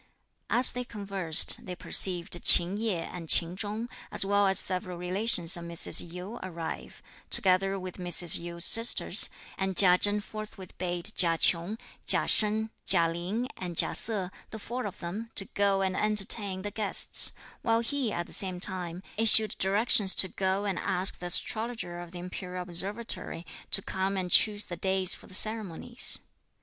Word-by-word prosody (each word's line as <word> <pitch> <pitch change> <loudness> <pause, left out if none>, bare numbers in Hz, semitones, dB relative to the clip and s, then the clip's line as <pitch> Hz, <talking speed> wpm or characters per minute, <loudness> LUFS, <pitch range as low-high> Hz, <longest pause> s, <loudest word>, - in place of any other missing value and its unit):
As 250 +1 +7
they 250 - -6
conversed, 195 -8 +1
they 180 - -6
perceived 175 -1 +1
Ch'in 175 +3 +6
Yeh 205 -6 -3
and 170 -3 -10
Ch'in 170 +1 +3
Chung, 210 +4 -6 0.2
as - - +3
well 200 0 +1
as 190 -1 +1
several 185 -2 +2
relations 180 -1 +1
of 170 -1 -8
Mrs. 170 0 +1
Yu, 185 +7 -9
arrive, 170 -3 -9 0.3
together 195 +1 +1
with 185 -1 -9
Mrs. 175 -1 +1
Yu's 170 0 -1
sisters; 230 +1 +4 0.3
and 190 -2 -4
Chia 180 -2 +4
Chen 205 0 +1
forthwith 210 -3 -10
bade 175 +2 -5
Chia 165 -2 +2
Ch'ung, 175 +6 +1 0.3
Chia - - +5
Shen, 220 +1 +2
Chia 170 -3 +4
Lin 185 +9 -5
and 175 -3 -8
Chia - - +3
Se, 205 -5 -5 0.2
the 220 - -9
four 235 +2 -6
of 200 - -11
them, 200 +7 -7
to 195 - +4
go 200 -1 -1
and 190 -1 -3
entertain 205 -2 0
the 205 - -6
guests; 210 -2 0 0.3
while 230 0 0
he, 255 -1 -3
at 175 - -5
the - - -14
same 185 -2 -4
time, 180 -2 -1
issued 220 -1 +6
directions 200 0 +3
to 190 - +5
go 190 +2 -3
and 195 -3 -3
ask 185 +2 -2
the 180 - -7
Astrologer 220 -1 -2
of 175 -1 -10
the 180 - -12
Imperial 180 0 -8
Observatory 180 0 -3 0.2
to 195 - +3
come 190 +1 -4
and 180 -1 -5
choose 210 -1 +2
the 175 - -9
days 190 +1 -1
for - - -8
the 185 - -1
ceremonies. 215 +2 +3
190 Hz, 170 wpm, -27 LUFS, 180-210 Hz, 0.3 s, As